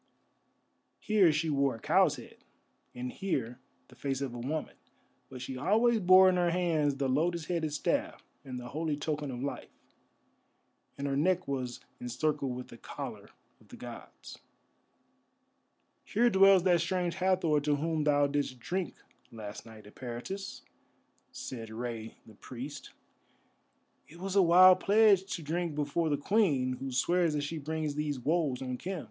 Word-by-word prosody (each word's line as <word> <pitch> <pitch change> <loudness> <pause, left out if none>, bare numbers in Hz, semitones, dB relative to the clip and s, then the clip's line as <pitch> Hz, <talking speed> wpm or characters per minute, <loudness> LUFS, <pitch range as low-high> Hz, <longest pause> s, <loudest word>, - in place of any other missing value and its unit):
Here 205 -6 +4
she 155 +1 0
wore 140 -2 +1
a - - -11
cow's - - +3
head, - - -12 0.6
and 125 0 -4
here 130 - -3 0.3
the - - -18
face 135 -2 -3
of 135 -3 -4
a 120 - -6
woman, 150 +6 -3 0.6
but 130 -1 -8
she 130 +1 -5
always 225 - +3
bore 185 0 +7
in 185 -1 +3
her 175 -1 +2
hands 165 -5 +1
the 135 0 -1
lotus 160 +5 0
headed 165 -3 -1
staff 145 - -1 0.2
and 130 -2 -6
the 120 0 -8
holy 155 0 -2
token 150 -1 -3
of 125 0 -5
life, 140 - -5 1.3
and 140 - -4
her 140 -1 -1
neck 180 +5 +1
was 130 -3 -4 0.2
encircled 135 +1 -2
with 125 0 -8
the - - -12
collar - - -8 0.3
of - - -23
the - - -12
gods. - - -11 1.6
"Here 235 +3 +2
dwells 195 -1 +6
that 175 -3 +3
Strange 175 0 -1
Hathor 180 -5 +2
to 145 0 +1
whom 155 +1 -1
thou 145 -1 +3
didst 140 -2 -2
drink 180 +8 -3 0.4
last 110 -1 -8
night, 110 -1 -13
Eperitus," 125 - -7 0.7
said 115 -3 -7
Rei 115 0 -6
the 110 - -15
Priest. 130 +7 -8 1.2
"It 165 - -15
was 190 +2 -4
a 200 - +6
wild 185 +1 +7
pledge 205 -2 +4
to 165 - -7
drink 165 +1 -2
before 150 +3 0
the 145 - +1
Queen, 145 - +1
who 135 0 -5
swears 165 +5 +2
that 145 - -1
she 155 +2 -4
brings 155 0 -3
these 145 -2 -2
woes 145 -1 0
on 125 -1 -4
Khem. 185 -1 -4
150 Hz, 160 wpm, -30 LUFS, 130-175 Hz, 1.6 s, bore